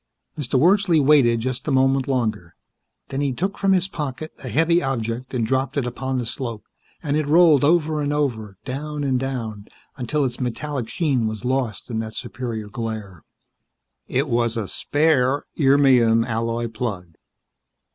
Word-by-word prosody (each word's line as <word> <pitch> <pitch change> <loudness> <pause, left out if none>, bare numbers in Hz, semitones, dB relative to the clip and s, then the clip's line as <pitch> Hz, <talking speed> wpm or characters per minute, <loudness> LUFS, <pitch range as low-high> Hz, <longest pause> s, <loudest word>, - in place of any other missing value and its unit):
Mr. 140 -3 -1
Wordsley 180 +2 +4
waited 135 -5 +4
just 130 +2 -3
a - - +1
moment 135 0 +2
longer; 110 -10 -2 0.5
then 135 - -2
he 140 -2 +1
took 185 +10 -3
from 195 -1 +2
his 185 -1 +3
pocket 150 -3 -5
a 130 - -5
heavy 165 +8 +3
object 125 -2 -3
and 115 -3 +1
dropped 130 +3 -1
it 135 - +1
upon 130 +2 -3
the 125 - -2
slope 115 -2 -5 0.4
and 145 -2 0
it 155 -1 0
rolled 155 -2 +6
over 155 0 +2
and 145 0 -1
over, 115 -9 -2
down 145 +3 -4
and 130 -2 +1
down, 115 -6 -4 0.3
until 140 +3 0
its 120 -2 -3
metallic 130 0 -3
sheen 135 -9 0
was 110 -1 -5
lost 125 -3 -2
in 110 - -1
that 110 0 -5
superior 115 -4 -5
glare. 105 -6 -6 0.8
It - - 0
was 115 0 0
a 110 -3 -2
spare 145 -1 +1 0.2
irmium 130 -5 +5
alloy 115 0 -1
plug. 105 -7 -5
130 Hz, 160 wpm, -22 LUFS, 115-145 Hz, 0.8 s, rolled